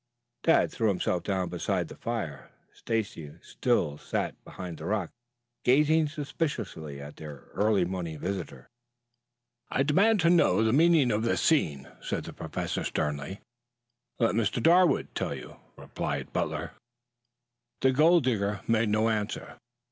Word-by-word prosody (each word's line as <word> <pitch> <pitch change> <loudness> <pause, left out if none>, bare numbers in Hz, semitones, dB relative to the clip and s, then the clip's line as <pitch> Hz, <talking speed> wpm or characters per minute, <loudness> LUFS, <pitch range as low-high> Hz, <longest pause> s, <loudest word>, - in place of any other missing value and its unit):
Tad 165 - +3
threw 115 - 0
himself 90 -3 0
down 95 -3 -1
beside 90 -1 -1
the - - -10
fire. - - -4 0.2
Stacy 105 -10 -3
still 75 0 0
sat - - -2
behind 90 -3 -8
the - - -7
rock, 100 -5 -1 0.5
gazing 150 +5 +4
suspiciously 145 - -4
at 70 +1 -10
their 75 -4 -10
early 105 -3 +2
morning 85 -3 -4
visitor. 85 -7 -5 1.0
"I 135 - +1
demand 200 +10 +4
to 170 +1 +4
know 110 - +4
the 110 0 +2
meaning 155 -4 +5
of 105 0 +1
this 115 - +1
scene," 75 - +2
said - - -3
the - - -8
Professor - - -4
sternly. 75 +6 -3 0.8
"Let 115 -2 +2
Mr. 115 +1 0
Darwood 175 +7 +4
tell - - -2
you," - - -10 0.2
replied - - -4
Butler. - - -2 1.1
The 130 - +4
gold 160 +4 +5
digger 105 -5 0
made 115 -1 +2
no 110 +1 +2
answer. 105 -2 -3
110 Hz, 140 wpm, -28 LUFS, 90-145 Hz, 1.1 s, meaning